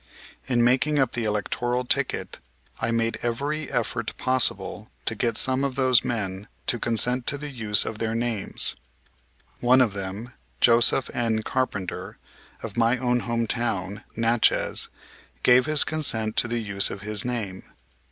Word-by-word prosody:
In 120 -2 +2
making 135 +5 +2
up 135 -3 +2
the 120 -2 -3
electoral 120 +4 -1
ticket - - -1 0.4
I - - -1
made 115 0 -1
every 140 +6 -3
effort 120 -1 -2
possible 130 -2 0 0.2
to - - +2
get 115 -2 -1
some 130 +1 +2
of 135 -2 -2
those 130 -2 +3
men 100 -4 -3 0.2
to 120 - 0
consent 120 +2 0
to 145 - +5
the 150 0 -6
use 110 -5 +1
of 110 - -5
their 115 0 -2
names. 115 -3 -1 0.8
One 125 +2 +4
of 120 -6 +3
them, 100 +5 -6 0.3
Joseph 120 +2 +4
N. 115 -3 -1
Carpenter, 100 -9 -3 0.5
of 110 -2 -7
my 115 +2 +3
own 125 -1 0
home 115 -1 -2
town, 105 -4 -2
Natchez, 115 +1 +2 0.6
gave 125 +2 +5
his 155 -1 +4
consent 110 -9 +2
to - - +4
the 120 +1 -2
use 100 -1 +3
of 100 - -7
his 105 -1 +2
name. 110 -7 -4
120 Hz, 150 wpm, -24 LUFS, 110-125 Hz, 0.8 s, to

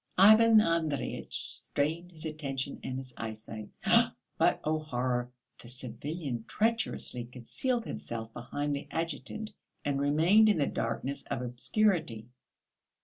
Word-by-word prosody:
Ivan 220 +3 +8
Andreyitch 165 - -1
strained 165 +5 -2
his 165 -2 -11
attention 140 -3 -4
and 130 - -3
his 130 -1 -8
eyesight, 110 -1 -6 0.7
but - - +3
oh, 155 +1 +1
horror! 125 -4 -1 0.3
The 120 - -12
civilian 130 +1 -5
treacherously 220 - 0
concealed 220 - -2
himself 115 - -5
behind 145 +4 -2
the 140 - -6
adjutant 165 +6 -4 0.3
and 140 -1 0
remained 165 +10 +5
in 205 - +4
the 145 - +3
darkness 130 +5 -2
of 125 - -2
obscurity. 125 - 0
145 Hz, 120 wpm, -31 LUFS, 125-170 Hz, 0.7 s, Ivan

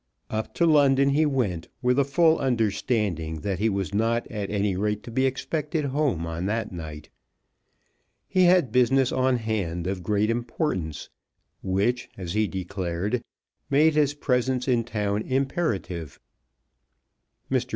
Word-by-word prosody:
Up 110 0 -3
to 170 - +3
London 140 -3 +5
he 155 +2 +3
went 105 - -1 0.2
with 125 +2 +3
a - - +5
full 160 +4 +3
understanding 105 - 0
that 95 -1 -2
he 110 +2 +2
was 100 -1 -2
not 115 +3 +1
at 105 -3 -4
any 100 -2 0
rate 105 +2 -1
to 120 - -9
be 130 +3 +2
expected 150 +4 -2
home 135 - 0
on 85 +3 -3
that 110 +1 -2
night. 80 -3 -8 1.2
He 185 -1 +3
had 175 -9 +4
business 125 +2 +3
on 130 -1 +2
hand 100 -7 -2
of 95 0 -2
great 105 +3 +1
importance, 115 - -3 0.5
which, 100 +6 0
as 90 -3 -5
he 110 0 +2
declared, 95 +4 -3 0.5
made 155 +3 +4
his 145 -1 +2
presence 125 -2 0
in 120 -3 +2
town 105 -2 -1
imperative. 130 - -2 1.3
Mr. - - 0
115 Hz, 140 wpm, -25 LUFS, 95-135 Hz, 1.3 s, London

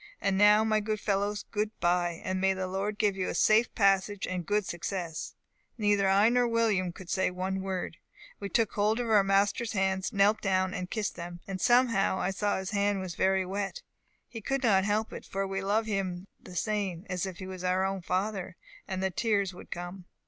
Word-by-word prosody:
And 195 - +1
now, 210 +2 +6
my 215 -1 +2
good 215 0 -2
fellows, 205 0 -1
good 210 +1 -2
bye! 175 -1 +1
and 185 0 -2
may 190 0 +3
the 190 0 -2
Lord 195 +3 -3
give 205 -3 +2
you 190 -1 -2
a - - -3
safe 220 +2 +4
passage 195 0 +2
and 180 -2 -4
good 210 -1 +1
success!' 175 -2 -4 0.4
Neither 205 -3 +2
I 200 +3 +5
nor 245 0 +3
William 220 -6 +1
could 185 +1 -12
say 190 +1 +1
one 190 +1 -3
word. 190 -3 -4 0.4
We 200 - -5
took 225 -1 +1
hold 215 +3 +1
of 220 -4 +3
master's 200 +4 +2
hands, 190 -1 0
knelt 205 0 +3
down, 190 -1 +1
and 180 -1 -4
kissed 215 -2 -2
them. 175 0 -7
And, 190 -1 -5
somehow, 240 -6 +3
I 190 - 0
saw 205 +1 0
his 190 +1 -4
hand 200 -1 +1
was 185 -2 -5
very 190 +1 +2
wet; 195 0 -4 0.5
we 225 - -6
could 270 +5 -2
not 195 -5 +4
help 215 +2 0
it, - - -7
for 195 +1 -3
we 195 0 -3
love 210 +3 +1
him 190 -4 -2 0.2
the 180 - -12
same 195 -2 -2
as 180 +1 -2
if 185 -2 -7
he 185 - -7
was 185 -1 -7
our 190 +1 0
father, 185 +1 -2 0.3
and 190 0 -3
the 190 - 0
tears 200 -2 0
would 180 - -12
come. 175 +1 -7
195 Hz, 205 wpm, -29 LUFS, 185-210 Hz, 0.5 s, now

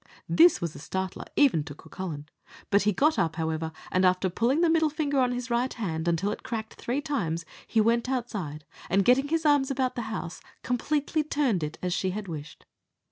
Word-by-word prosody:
This 340 +2 +6
was 170 -3 -3
a - - -10
startler 190 +5 -4
even 255 - +4
to 145 -4 -8
Cucullin; 160 -2 -7 0.5
but 200 0 +5
he 210 - +3
got 300 +10 +2
up, 165 -1 +1
however, 160 0 -2 0.2
and 185 - +2
after 185 0 +3
pulling 245 - +2
the 345 - +5
middle 320 -1 +3
finger 285 -3 +1
of 250 - +2
his 245 0 -4
right 245 +2 +1
hand 170 -7 -3
until 170 +4 +1
it - - -5
cracked 220 -2 -5
three 255 +4 -2
times, 175 - -2 0.2
he 225 - +1
went 235 +3 +2
outside, 200 - -3 0.2
and 195 +2 +3
getting 265 +3 +4
his 325 +1 0
arms 290 -3 +4
about 260 -2 0
the 240 - -3
house, 185 -5 -5 0.2
completely 295 +5 0
turned 280 - +1
it 150 +1 -4
as 180 -1 0
she 190 - 0
had 200 +2 -4
wished. 150 -3 -8
220 Hz, 200 wpm, -27 LUFS, 170-270 Hz, 0.5 s, This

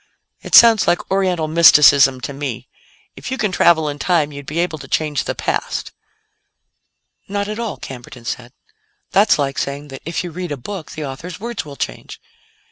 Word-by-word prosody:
"It - - 0
sounds 230 -2 +7
like 175 - 0
Oriental 185 -4 0
mysticism 145 -5 +6
to 140 - -5
me. 130 -3 -5 0.5
If - - -8
you 260 - -3
can 210 -5 -1
travel 170 -3 +3
in 145 0 -5
time, 160 -3 +1
you'd 140 -1 -10
be 155 - -5
able 170 -2 -1
to 135 - -10
change 150 0 -1
the - - -3
past." - - -3 1.4
"Not 200 0 -2
at 215 +2 -5
all," 230 -3 -4
Camberton 125 -2 -10
said; 120 0 -5 0.6
"that's 205 +2 +4
like 140 -2 -2
saying 140 +1 -4
that 135 -1 -9
if 165 +3 -3
you 175 - -6
read 175 0 -6
a 145 - -3
book, 180 +6 -8
the 155 - -5
author's 150 +6 -8
words 235 -5 -5
will 145 -2 -10
change. - - -6
155 Hz, 185 wpm, -19 LUFS, 140-185 Hz, 1.4 s, sounds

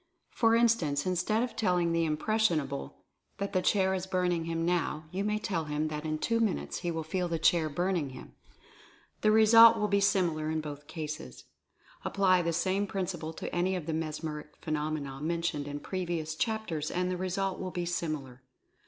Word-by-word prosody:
For 225 -1 +3
instance, 200 -12 +2
instead 185 +5 +1
of 250 - -4
telling 180 -5 +1
the 165 0 +2
"impressionable" 155 - -1 0.3
that 200 +1 -3
the 185 - +2
chair 190 0 +2
is 190 0 -3
burning 180 -3 0
him 165 0 -1
now, 170 -3 0
you 190 +2 -2
may 210 +1 0
tell 190 -7 -2
him 150 +1 -1
that 150 0 -5
in 155 0 -1
two 230 +8 0
minutes 220 -5 -1
he 175 - -3
will 165 -1 -2
feel 180 +3 -1
the 170 -1 -1
chair 160 0 +3
burning' 175 -1 -1
him 130 - -11 0.4
— - - -27
the 215 - +4
result 220 +1 +8
will 210 - +1
be 200 0 +2
similar 170 -6 +1
in 160 0 0
both 145 -1 -7
cases. 150 - -6 0.6
Apply 185 -2 +3
the 170 0 0
same 190 +4 0
principle 180 -5 -3
to - - -6
any 180 +2 +1
of 175 -4 -4
the 160 - -2
mesmeric 155 -1 -4
phenomena 150 -3 -3
mentioned 165 -2 -1
in 145 0 -4
previous 170 -3 -3
chapters 175 -6 -2
and 180 0 -1
the - - -1
result 185 +1 -2
will 185 - -3
be 175 -1 -3
similar. 155 -7 -3
170 Hz, 185 wpm, -30 LUFS, 155-190 Hz, 0.6 s, result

